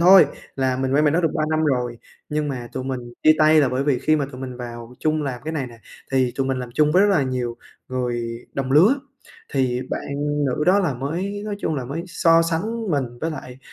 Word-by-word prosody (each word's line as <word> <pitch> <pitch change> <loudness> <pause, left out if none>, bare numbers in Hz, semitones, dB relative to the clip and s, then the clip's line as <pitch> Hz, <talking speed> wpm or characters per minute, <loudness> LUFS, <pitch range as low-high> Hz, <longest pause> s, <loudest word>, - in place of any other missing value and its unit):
thôi, 185 0 +8 0.3
là 130 -1 +1
mình 130 +1 -1
quen 150 +2 +4
bạn 150 - +4
đó 170 - +3
được 165 - +2
3 155 - +1
năm 155 0 +2
rồi. 125 -5 0 0.3
Nhưng 150 -1 -1
mà 125 -4 -5
tụi 130 0 -4
mình 130 -1 -3 0.2
chia 155 - +7
tay 155 0 +6
là 140 - +3
bởi 130 +2 -1
vì 140 -4 +2
khi 155 - +2
mà 145 -2 -1
tụi 130 - -9
mình 130 -2 -6
vào 120 0 -8
chung 155 0 0
làm 130 -4 -3
cái 160 - -3
này 145 -5 -2
nè, 115 -2 -13 0.3
thì 130 -2 +2
tụi 135 -1 0
mình 130 -1 -1
làm 125 -1 -5
chung 150 -1 +3
với 185 - +6
rất 205 - +4
là 190 -8 +3
nhiều 125 -2 -2 0.3
người 120 -2 -3
đồng 135 -1 -2
lứa, 180 - +6 0.6
thì 130 -3 +1
bạn - - -2 0.4
nữ 135 +4 0
đó 190 +3 +5
là 175 -9 +1
mới 175 +11 -3
nói 210 -1 -3
chung 160 - -1
là 130 -4 -3
mới 145 +7 -4
so 165 -2 +4
sánh 200 +6 -2
mình 140 -3 +1 0.2
với 165 - -1
lại 130 -4 -8
140 Hz, 245 wpm, -22 LUFS, 125-160 Hz, 0.6 s, thôi